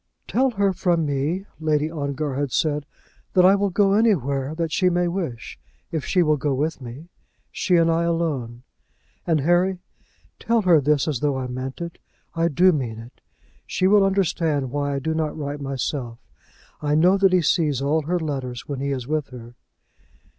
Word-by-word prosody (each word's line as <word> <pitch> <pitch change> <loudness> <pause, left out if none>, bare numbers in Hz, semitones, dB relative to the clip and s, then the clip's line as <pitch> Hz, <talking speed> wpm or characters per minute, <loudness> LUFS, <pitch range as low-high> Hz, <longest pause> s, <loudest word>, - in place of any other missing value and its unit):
"Tell 265 +2 +2
her 200 -4 +1
from 170 -3 +1
me," 145 +7 -1
Lady 155 -1 0
Ongar 145 -2 -3
had 140 0 -2
said, 150 0 0 0.5
"that 180 -2 +5
I 190 - +7
will 200 0 +1
go 195 +1 +2
anywhere 150 - +1
that 165 -1 -2
she 185 +2 +2
may 175 0 +1
wish 165 - -5 0.3
if 160 -4 -2
she 180 -2 +2
will 155 -2 +2
go 140 0 -1
with 150 +2 -2
me, 130 +7 -9 0.4
she 180 - +1
and 165 -1 +4
I 165 +1 +1
alone; 140 -9 -2 0.6
and, 160 -3 +2
Harry, 175 +5 +2 0.6
tell 230 -1 +1
her 170 -5 +5
this 145 +1 +1
as 145 -6 -1
though 145 -1 0
I 130 - -3
meant 130 +4 -6
it. 170 -1 -6 0.3
I 165 0 +1
do 175 +4 +4
mean 125 -8 -3
it. 115 +2 -13 0.5
She 185 - -1
will 200 +1 +5
understand 165 -8 0
why 145 0 -1
I - - -1
do 160 +4 -2
not 160 -1 -2
write 145 -1 -5
myself. 135 -3 -3 0.6
I 150 0 +1
know 180 +5 +5
that 195 -1 +4
he 180 -2 +3
sees 150 -4 +1
all 145 +3 +1
her 170 +4 -1
letters 130 -6 -4
when 140 -2 -4
he 140 +1 -2
is 130 -3 -3
with 155 -1 -1
her." 120 -2 -11
155 Hz, 185 wpm, -23 LUFS, 140-175 Hz, 0.6 s, I